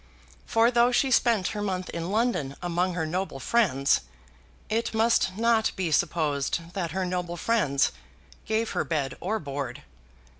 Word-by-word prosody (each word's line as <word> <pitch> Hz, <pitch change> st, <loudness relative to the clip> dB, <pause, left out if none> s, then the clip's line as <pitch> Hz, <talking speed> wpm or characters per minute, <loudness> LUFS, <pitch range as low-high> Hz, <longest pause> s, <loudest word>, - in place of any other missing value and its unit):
For 230 Hz, +1 st, +4 dB
though 240 Hz, 0 st, +4 dB
she 260 Hz, +2 st, +2 dB
spent 230 Hz, -6 st, +3 dB
her 210 Hz, -, -4 dB
month 185 Hz, -3 st, -2 dB
in 170 Hz, +1 st, -4 dB
London 195 Hz, -, 0 dB
among 175 Hz, +1 st, -1 dB
her 165 Hz, -3 st, -1 dB
noble 175 Hz, -3 st, -3 dB
friends, 140 Hz, -, +2 dB, 0.7 s
it 225 Hz, +1 st, -1 dB
must 220 Hz, -4 st, +2 dB
not 225 Hz, -1 st, +3 dB
be 180 Hz, -4 st, -2 dB
supposed 155 Hz, +1 st, 0 dB
that 180 Hz, -4 st, -2 dB
her 185 Hz, +3 st, -2 dB
noble 180 Hz, -1 st, -3 dB
friends 160 Hz, -10 st, +2 dB, 0.6 s
gave 220 Hz, +1 st, 0 dB
her -, -, 0 dB
bed 145 Hz, -5 st, -2 dB
or 215 Hz, +5 st, -1 dB
board. 140 Hz, -, -5 dB
185 Hz, 150 wpm, -27 LUFS, 160-225 Hz, 0.7 s, For